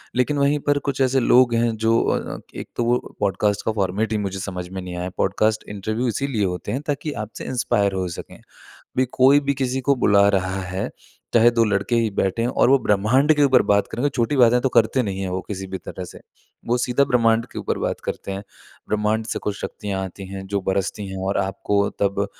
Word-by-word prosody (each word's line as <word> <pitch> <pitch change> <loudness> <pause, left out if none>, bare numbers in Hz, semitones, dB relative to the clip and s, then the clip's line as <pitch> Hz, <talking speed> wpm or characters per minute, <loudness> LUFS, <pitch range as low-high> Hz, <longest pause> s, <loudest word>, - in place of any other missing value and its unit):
लेकिन 125 +4 +1
वहीं 140 +1 +2
पर 145 - +3
कुछ 135 -1 -1
ऐसे 135 0 +3
लोग 125 -1 +4
हैं 115 -1 +1
जो 115 +1 +4
अ, - - -2 0.2
एक - - -6
तो 120 - 0
वो 120 +1 -1
पॉडकास्ट 100 +1 0
का - - +1
फ़ॉर्मेट 100 +1 -1
ही 110 - +1
मुझे 95 0 -4
समझ 90 -2 -5
में 95 0 -6
नहीं 90 -1 -7
आया। 90 +1 -3
पॉडकास्ट 110 +3 +1
इंटरव्यू 110 +4 -2
इसीलिए 120 -2 -1
होते 90 -2 -3
हैं 135 - -2
ताकि 145 +1 -2
आपसे 110 - -10
इंस्पायर 100 -5 0
हो 95 -1 -1
सकें। - - -9 0.4
अभी 130 - -2
कोई 135 +3 +5
भी 140 - +3
किसी 130 0 -1
को 140 - +6
बुला 100 0 +5
रहा 95 -1 0
है 95 +1 -3 0.5
चाहे 120 0 +6
2 115 -1 +2
लड़के 105 +3 0
ही 115 -2 +1
बैठे 95 +5 +1
हैं 120 - +1
और 125 - +2
वो 135 - +6
ब्रह्मांड 125 +8 +3
के 145 - +3
ऊपर 130 -2 +5
बात 100 0 +3
करेंगे। 125 +5 0
छोटी 130 +3 0
बातें 125 -1 +5
तो 135 - +1
करते 120 +2 +3
नहीं 100 -4 -3
है, 95 -1 -3
वो 95 - -2
किसी 95 -2 -5
भी 95 0 -5
तरह 90 - -7
से। - - -12 0.5
वो 120 - +2
सीधा 125 +3 +2
ब्रह्मांड 115 -3 +2
के - - -5
ऊपर - - -2
बात - - -2
करते 100 - -4
हैं। 95 +1 -5 0.5
ब्रह्मांड 105 +1 0
से - - -3
कुछ 100 -1 -3
शक्तियाँ 100 -2 -4
आती 95 +1 -8
हैं 95 0 -7
जो 100 +1 -1
बरसती 100 +1 -2
हैं 95 - -6
और 100 - 0
आपको 100 +1 0
तब 100 0 +1
110 Hz, 220 wpm, -22 LUFS, 95-125 Hz, 0.5 s, को